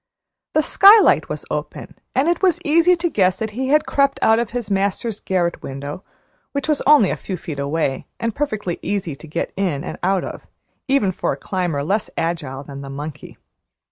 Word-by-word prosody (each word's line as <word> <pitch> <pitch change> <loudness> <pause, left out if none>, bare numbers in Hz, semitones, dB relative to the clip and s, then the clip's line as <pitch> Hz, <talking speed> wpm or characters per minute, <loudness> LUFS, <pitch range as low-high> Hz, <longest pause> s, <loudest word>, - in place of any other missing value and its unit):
The 310 - +4
skylight 405 +6 +6
was - - -5
open, - - -5 0.2
and 265 +4 +2
it 345 - +1
was 370 -4 +3
easy 335 +4 +5
to 345 0 -1
guess 190 - +2
that 220 -1 -3
he 260 +5 -3
had 300 +3 +3
crept 275 0 +1
out 220 +1 +5
of 235 -2 -1
his 235 -4 -4
master's 200 +3 -1
garret 175 -2 -1
window, 140 +6 -6 0.5
which 280 0 -2
was 305 -2 +2
only 285 -10 +6
a - - -1
few 190 - -5
feet 155 -4 -7
away 140 -1 -1
and 230 -1 -1
perfectly 215 -11 -3
easy 190 -7 -2
to 160 - -13
get 155 +3 -3
in 180 -8 -1
and - - -6
out 190 0 +1
of, - - -8 0.4
even 265 -8 +2
for - - -2
a - - -7
climber 175 -7 -2
less 205 +7 -1
agile 150 -5 -3
than 140 0 -9
a 135 - -8
monkey. 145 +2 -8
195 Hz, 195 wpm, -20 LUFS, -, 0.5 s, skylight